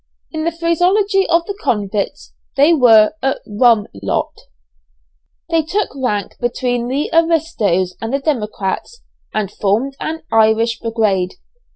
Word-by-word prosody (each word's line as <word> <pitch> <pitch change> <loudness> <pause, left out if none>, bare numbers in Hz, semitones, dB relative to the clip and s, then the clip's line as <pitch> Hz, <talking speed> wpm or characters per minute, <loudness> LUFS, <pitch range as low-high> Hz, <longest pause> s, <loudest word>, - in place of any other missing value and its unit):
In 315 -1 -3
the 335 - +1
phraseology 365 +4 +1
of 335 0 +3
the 405 - -4
convicts, 205 - -2 0.2
they 290 +5 +5
were 225 -7 +6
a 270 0 +1
"rum 220 0 +3 0.2
lot." 100 - -1 1.2
They 330 -1 +3
took 390 +7 -1
rank 210 -7 -2
between 245 0 -1
the 275 +4 -2
"Aristoes," 300 - +1
and 225 +1 -3
the 275 - +1
"Democrats," 240 - -3 0.3
and 210 -3 -2
formed 220 +8 -1
an 320 +1 -4
"Irish 225 +1 +3
Brigade." 210 -5 0
245 Hz, 130 wpm, -17 LUFS, 210-325 Hz, 1.2 s, were